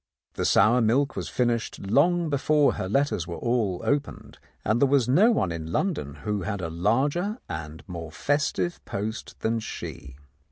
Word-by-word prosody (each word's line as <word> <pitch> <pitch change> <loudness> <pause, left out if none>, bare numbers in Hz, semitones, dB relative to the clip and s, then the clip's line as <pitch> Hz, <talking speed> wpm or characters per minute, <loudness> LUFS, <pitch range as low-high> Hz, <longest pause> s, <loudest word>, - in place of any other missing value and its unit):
The - - -2
sour 115 +5 +5
milk 135 +6 +2
was - - -4
finished 120 -2 0
long 165 - +2
before 145 +1 +3
her 95 - -4
letters 120 - +1
were 85 - -5
all 115 -7 0
opened, 145 0 -2 0.2
for 110 - +2
there 120 +5 +3
was 135 -3 +3
no 180 - +5
one 95 - +1
in 80 -1 -5
London 85 - -1
who 105 -1 -1
had 100 +2 -3
a 85 -3 -4
larger 140 - 0
and 80 0 -6
more 85 -3 -7
festive 150 - -1
post 110 +4 -5
than 115 +1 0
she. 70 -9 -7
115 Hz, 165 wpm, -26 LUFS, 90-145 Hz, 0.2 s, sour